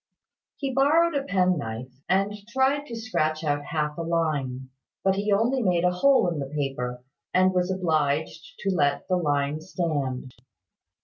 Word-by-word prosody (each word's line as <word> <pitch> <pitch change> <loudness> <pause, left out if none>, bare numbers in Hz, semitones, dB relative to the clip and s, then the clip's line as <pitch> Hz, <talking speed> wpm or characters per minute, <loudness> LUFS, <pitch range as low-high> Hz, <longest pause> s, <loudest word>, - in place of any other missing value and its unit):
He 275 -2 -3
borrowed 315 +6 +4
a 280 - +1
penknife, 160 - -1 0.2
and 195 +2 +2
tried 265 +4 +1
to 235 - -6
scratch 155 -9 -1
out 145 -1 -1
half 150 0 -2
a - - -1
line; 145 -6 -1 0.3
but 190 - +3
he 200 +2 -1
only 235 +6 +2
made 180 -5 +2
a 180 - +4
hole 265 +6 +4
in 165 -3 -3
the 135 - -3
paper, 135 -4 -3 0.3
and 185 0 +4
was 180 0 +1
obliged 160 -4 -1
to 195 - 0
let 145 -5 +1
the 185 - +2
line 145 -2 0
stand. 145 -8 -3
170 Hz, 160 wpm, -26 LUFS, 145-200 Hz, 0.3 s, borrowed